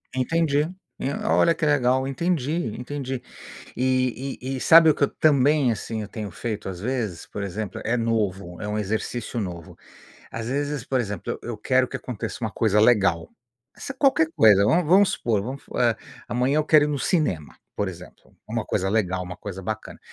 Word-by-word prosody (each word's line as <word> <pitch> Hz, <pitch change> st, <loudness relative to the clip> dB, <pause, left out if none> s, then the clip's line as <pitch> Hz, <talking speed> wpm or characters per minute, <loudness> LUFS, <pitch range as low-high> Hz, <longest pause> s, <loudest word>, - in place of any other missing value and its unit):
Entendi, 145 Hz, +2 st, +1 dB, 0.4 s
eh, 140 Hz, -, -2 dB
olha 170 Hz, -, +4 dB
que 165 Hz, -, -2 dB
legal. 130 Hz, -2 st, +2 dB
Entendi, 155 Hz, -3 st, -1 dB
entendi. 130 Hz, -1 st, -4 dB, 0.6 s
E 130 Hz, +1 st, 0 dB
e 130 Hz, +1 st, -3 dB
e -, -, -5 dB
sabe 165 Hz, -1 st, +7 dB
o -, -, +3 dB
que -, -, +2 dB
eu -, -, +1 dB
também, 145 Hz, -2 st, +3 dB
assim, 110 Hz, +1 st, -4 dB
eu 105 Hz, -, -7 dB
tenho 105 Hz, -2 st, -6 dB
feito 105 Hz, +2 st, -5 dB
às 90 Hz, -1 st, -6 dB
vezes? 110 Hz, -7 st, -3 dB
Por 105 Hz, -, -6 dB
exemplo, 100 Hz, +1 st, -4 dB
é 120 Hz, +2 st, +1 dB
novo, 100 Hz, -6 st, -2 dB
é 105 Hz, -, -4 dB
um 105 Hz, -, -2 dB
exercício 110 Hz, +3 st, -3 dB
novo. 85 Hz, -5 st, -6 dB, 0.5 s
Às 115 Hz, 0 st, -5 dB
vezes, 145 Hz, 0 st, -2 dB
por 130 Hz, -1 st, 0 dB
exemplo, 105 Hz, -5 st, -4 dB
eu -, -, -8 dB
eu 115 Hz, -, -4 dB
quero 130 Hz, +3 st, +2 dB
que -, -, -4 dB
aconteça 120 Hz, -4 st, -6 dB
uma 110 Hz, -2 st, -2 dB
coisa 105 Hz, 0 st, +2 dB
legal. 100 Hz, -8 st, +3 dB, 0.5 s
Essa 270 Hz, -, -6 dB
é 265 Hz, -, -25 dB
qualquer 270 Hz, -, +4 dB
coisa 105 Hz, -3 st, +6 dB
vamos 155 Hz, +10 st, +3 dB
vamos 190 Hz, +3 st, +6 dB
supor, 110 Hz, -4 st, 0 dB
vamos 130 Hz, +6 st, -6 dB
f -, -, -24 dB
eh, 120 Hz, -2 st, +3 dB, 0.3 s
amanhã 125 Hz, +4 st, +1 dB
eu 155 Hz, -, +1 dB
quero 155 Hz, -1 st, +5 dB
ir -, -, -1 dB
no 145 Hz, -2 st, -1 dB
cinema, 90 Hz, -, -1 dB, 0.2 s
por 100 Hz, -, -1 dB
exemplo, 90 Hz, -1 st, -12 dB
uma -, -, -2 dB
coisa 95 Hz, -, -1 dB
legal, 95 Hz, -3 st, 0 dB
uma 90 Hz, 0 st, -7 dB
coisa 95 Hz, -2 st, -7 dB
bacana. 110 Hz, +3 st, -5 dB
120 Hz, 195 wpm, -24 LUFS, 105-140 Hz, 0.6 s, sabe